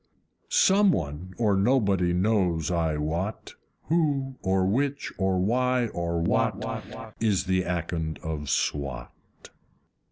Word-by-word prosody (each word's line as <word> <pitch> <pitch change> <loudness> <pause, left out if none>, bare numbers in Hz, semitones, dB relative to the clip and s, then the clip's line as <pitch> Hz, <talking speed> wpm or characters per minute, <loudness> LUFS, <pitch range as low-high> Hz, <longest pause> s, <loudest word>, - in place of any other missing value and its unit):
Some 205 - +5
one, 85 - -4
or 105 -4 +2
nobody, 100 -4 +2
knows 90 -4 +1
I 80 -3 0
wot 85 +8 -3 0.3
Who 145 -5 0
or 95 0 +1
which 135 +8 -1
or 95 -1 +1
why 125 +4 +1
or 85 -2 -2
what 110 +5 -2
Is 105 -4 +1
the 95 0 +1
Akond 85 -3 -2
of 75 -3 -4
Swat! 65 -4 -2
95 Hz, 115 wpm, -26 LUFS, 85-120 Hz, 0.3 s, Some